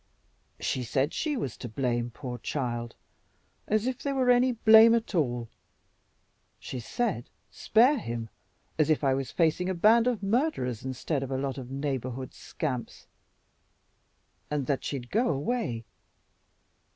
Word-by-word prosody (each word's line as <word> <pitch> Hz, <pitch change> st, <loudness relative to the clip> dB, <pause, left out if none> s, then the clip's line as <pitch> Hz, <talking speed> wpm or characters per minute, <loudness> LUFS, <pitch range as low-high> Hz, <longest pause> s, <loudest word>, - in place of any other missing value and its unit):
"She 130 Hz, -, -1 dB
said 135 Hz, +5 st, 0 dB
she 300 Hz, -3 st, -1 dB
was 130 Hz, -, -3 dB
to 120 Hz, -, -7 dB
blame, 120 Hz, 0 st, -1 dB
poor 125 Hz, 0 st, -7 dB
child! 120 Hz, -4 st, -3 dB, 0.7 s
As 215 Hz, +1 st, +1 dB
if 255 Hz, 0 st, -2 dB
there 280 Hz, -1 st, -2 dB
were 255 Hz, -2 st, +4 dB
any 250 Hz, +1 st, +4 dB
blame 225 Hz, 0 st, +7 dB
at 230 Hz, -2 st, -2 dB
all! 125 Hz, -8 st, 0 dB, 1.1 s
She 130 Hz, -, -6 dB
said, 170 Hz, -, -2 dB, 0.2 s
'spare 250 Hz, +6 st, +3 dB
him,' 115 Hz, -, -5 dB, 0.5 s
as 155 Hz, -, +3 dB
if 155 Hz, -1 st, +2 dB
I 135 Hz, -1 st, +3 dB
was 135 Hz, -1 st, -2 dB
facing 175 Hz, +2 st, +1 dB
a 190 Hz, -, -1 dB
band 225 Hz, +6 st, +5 dB
of 235 Hz, -5 st, -1 dB
murderers 195 Hz, -, 0 dB
instead 130 Hz, +3 st, -2 dB
of 135 Hz, -, -4 dB
a 135 Hz, -, -1 dB
lot 135 Hz, 0 st, -3 dB
of 125 Hz, -1 st, -8 dB
neighborhood 130 Hz, -2 st, -4 dB
scamps, 130 Hz, -6 st, -5 dB, 1.4 s
and 150 Hz, -2 st, -1 dB
that 140 Hz, -1 st, -1 dB
she'd 125 Hz, -4 st, -5 dB
go 235 Hz, +4 st, +2 dB
away. 140 Hz, -, -2 dB
140 Hz, 145 wpm, -28 LUFS, -, 1.4 s, blame